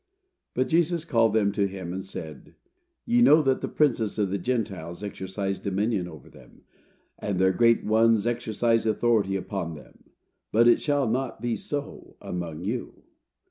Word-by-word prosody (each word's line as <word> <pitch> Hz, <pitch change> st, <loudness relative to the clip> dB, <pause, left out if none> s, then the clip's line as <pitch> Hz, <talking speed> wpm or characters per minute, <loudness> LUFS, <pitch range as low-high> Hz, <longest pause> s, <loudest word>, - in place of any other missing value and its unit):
"But 130 Hz, +1 st, +1 dB
Jesus 170 Hz, 0 st, +1 dB
called 115 Hz, -7 st, +2 dB
them 105 Hz, -2 st, +2 dB
to 100 Hz, 0 st, +1 dB
him 95 Hz, -2 st, -6 dB
and 95 Hz, +1 st, -4 dB
said, 80 Hz, -6 st, -9 dB, 0.5 s
Ye 240 Hz, +1 st, +3 dB
know 155 Hz, -9 st, +6 dB
that 135 Hz, -1 st, +1 dB
the -, -, -2 dB
princes 120 Hz, -8 st, +1 dB
of 100 Hz, -3 st, 0 dB
the 100 Hz, -, -1 dB
Gentiles 95 Hz, -6 st, -3 dB
exercise 95 Hz, 0 st, -4 dB
dominion 100 Hz, -1 st, -1 dB
over 80 Hz, -6 st, -12 dB
them, -, -, -18 dB, 0.6 s
and 100 Hz, -3 st, -2 dB
their 95 Hz, +1 st, +4 dB
great 115 Hz, +3 st, +3 dB
ones 110 Hz, 0 st, +3 dB
exercise 115 Hz, -1 st, 0 dB
authority 110 Hz, -3 st, +2 dB
upon 95 Hz, -4 st, -4 dB
them; 75 Hz, -, -16 dB, 0.5 s
but 115 Hz, +2 st, +4 dB
it 120 Hz, -, +5 dB
shall 145 Hz, -3 st, +1 dB
not 125 Hz, +1 st, -2 dB
be 120 Hz, 0 st, -1 dB
so 145 Hz, -1 st, -6 dB
among 85 Hz, -2 st, -5 dB
you. 115 Hz, +6 st, -5 dB
110 Hz, 160 wpm, -26 LUFS, 95-120 Hz, 0.6 s, know